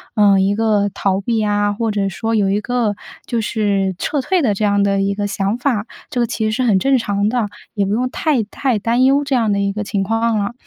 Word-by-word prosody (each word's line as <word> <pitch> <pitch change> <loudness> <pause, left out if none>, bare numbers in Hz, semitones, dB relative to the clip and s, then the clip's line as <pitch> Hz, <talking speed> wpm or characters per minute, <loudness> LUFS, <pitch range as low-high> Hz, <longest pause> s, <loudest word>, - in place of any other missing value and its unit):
呃， 200 -2 +5
一 195 +1 +2
个 210 -2 +1
逃 195 -1 0
避 220 +1 0
啊， 205 0 +1
或 225 +2 -2
者 200 -1 0
说 225 +4 -2
有 200 -2 +2
一 200 - +1
个， 235 -3 -1 0.3
就 235 -2 -1
是 200 -4 0
撤 290 - -1
退 365 +6 +1
的 225 -7 +2
这 200 - -3
样 205 -1 +2
的 195 -1 +1
一 200 0 0
个 205 0 -2
想 200 +2 -1
法。 240 -4 -1 0.2
这 245 - -3
个 235 - +1
其 220 - -2
实 215 - 0
是 255 - 0
很 220 -6 +3
正 270 +2 +3
常 205 -3 0
的， 240 -3 0 0.3
也 200 -2 0
不 200 - -1
用 250 +3 0
太 285 -8 0
太 245 +3 -1
担 235 +4 +1
忧 275 +2 +4
这 280 -2 -1
样 225 -3 +1
的 200 - +1
一 200 0 0
个 210 - -3
情 200 -1 -1
况 225 +2 0
了。 205 +3 -2
210 Hz, 270 characters per minute, -18 LUFS, 200-235 Hz, 0.3 s, 呃